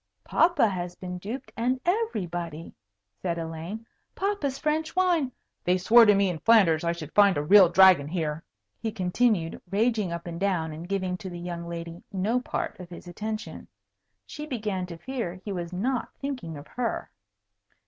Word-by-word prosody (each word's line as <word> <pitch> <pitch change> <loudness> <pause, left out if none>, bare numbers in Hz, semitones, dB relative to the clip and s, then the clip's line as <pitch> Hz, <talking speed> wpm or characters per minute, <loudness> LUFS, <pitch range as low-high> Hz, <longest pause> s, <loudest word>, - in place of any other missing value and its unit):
"Papa 330 -8 +3
has 180 -3 -4
been 180 -1 -6
duped, 235 +8 -6
and 250 +3 0
everybody," 175 - -2 0.5
said 170 +8 -1
Elaine. 165 +7 -5 0.3
"Papa's 380 -9 -1
French 315 +1 -1
wine 350 -8 +2 0.2
" - - -52
"They 180 +1 +3
swore 230 +5 +7
to 205 - +6
me 200 0 +3
in 175 -3 -3
Flanders 190 -8 +5
I 170 - +1
should 165 -3 -7
find 200 -4 +5
a 145 - 0
real 190 +2 +7
dragon 180 -5 +6
here," 160 -2 -2 0.4
he 225 - -2
continued, 185 -2 0
raging 215 -2 +1
up 170 0 -5
and 170 -1 -6
down, 180 -5 0
and 165 +4 -8
giving 185 -2 -1
to 190 0 -7
the 175 - -7
young 170 -1 -5
lady 170 0 -6
no 205 +5 +1
part 245 - -4
of 180 -1 -9
his 175 0 -10
attention. 215 +5 -5 0.6
She 300 0 -7
began 210 -9 -3
to 170 -2 -8
fear 230 -2 -4
he 195 +3 -7
was 175 -2 -4
not 235 +7 -1
thinking 255 - -5
of 145 - -10
her. 245 -2 -3
190 Hz, 175 wpm, -27 LUFS, 170-230 Hz, 0.6 s, swore